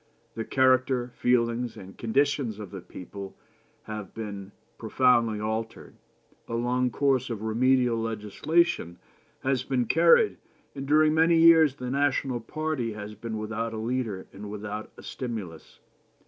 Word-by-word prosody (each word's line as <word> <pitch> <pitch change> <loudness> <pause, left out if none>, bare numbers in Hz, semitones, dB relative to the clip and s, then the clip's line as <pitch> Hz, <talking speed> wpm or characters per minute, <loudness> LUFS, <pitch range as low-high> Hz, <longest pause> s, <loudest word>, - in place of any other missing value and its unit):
The 115 - -4
character, 130 -1 +2
feelings, 120 -1 0
and 95 -2 -11
conditions 135 -1 0
of 105 -4 -8
the 95 -2 -7
people 95 +2 -9 0.5
have 105 -3 -7
been 100 -3 -6 0.3
profoundly 115 -1 +2
altered. 110 +1 -4 0.5
A 115 - -3
long 125 +2 +1
course 130 -1 +1
of 110 -3 -5
remedial 125 +2 +2
legislation 110 - 0 0.5
has 130 -2 +1
been 130 -1 0
carried, 170 - +4 0.4
and 135 -1 -6
during 155 +1 +4
many 165 +1 +4
years 165 -4 +6
the 125 -2 -5
national 135 -2 0
party 130 -1 -3
has 105 0 -7
been 110 +1 -6
without 115 +1 -3
a - - -4
leader 115 -4 -2
and 105 +1 -8
without 105 +1 -6
a - - -12
stimulus. 105 -11 -7
115 Hz, 135 wpm, -27 LUFS, 105-130 Hz, 0.5 s, years